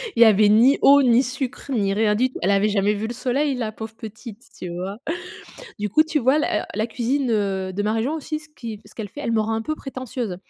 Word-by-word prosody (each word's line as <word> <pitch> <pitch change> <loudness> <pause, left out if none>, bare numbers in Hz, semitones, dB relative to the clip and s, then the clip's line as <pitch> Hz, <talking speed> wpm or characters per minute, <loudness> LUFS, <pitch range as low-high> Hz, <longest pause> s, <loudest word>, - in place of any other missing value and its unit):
Il 235 - +2
y - - +10
avait 210 -1 +5
ni 235 +6 +5
eau, 280 +1 +7
ni 245 +1 +4
sucre, 260 +1 -5
ni 200 -5 +1
rien 210 -1 +2
du 255 +4 +2
tout. - - -9
Elle 195 - +3
avait 200 +2 +3
jamais 205 0 +2
vu 215 +2 -3
le 240 - -5
soleil, 270 +3 0
la 225 -3 -3
pauvre 220 0 -8
petite, 225 +1 -10
tu 180 - -6
vois? 185 +4 -5 0.8
Du 210 0 -2
coup, 310 +10 +4
tu 315 -1 -1
vois, 265 +4 +3
la 210 - -1
la 215 +2 0
cuisine, 250 +3 -1
heu, 195 -3 -1
de 205 +2 -2
ma 210 +1 0
région 235 +7 0
aussi, 310 0 -4
ce 305 0 -16
qui 225 -3 -7
ce 205 - -16
qu'elle 215 -3 -6
fait, 290 - -9
elle 230 -5 -2
me 220 - +2
rend 220 +1 -1
un 225 - -2
peu 310 +6 -2
prétentieuse, 255 -8 -5
225 Hz, 255 wpm, -22 LUFS, 210-260 Hz, 0.8 s, y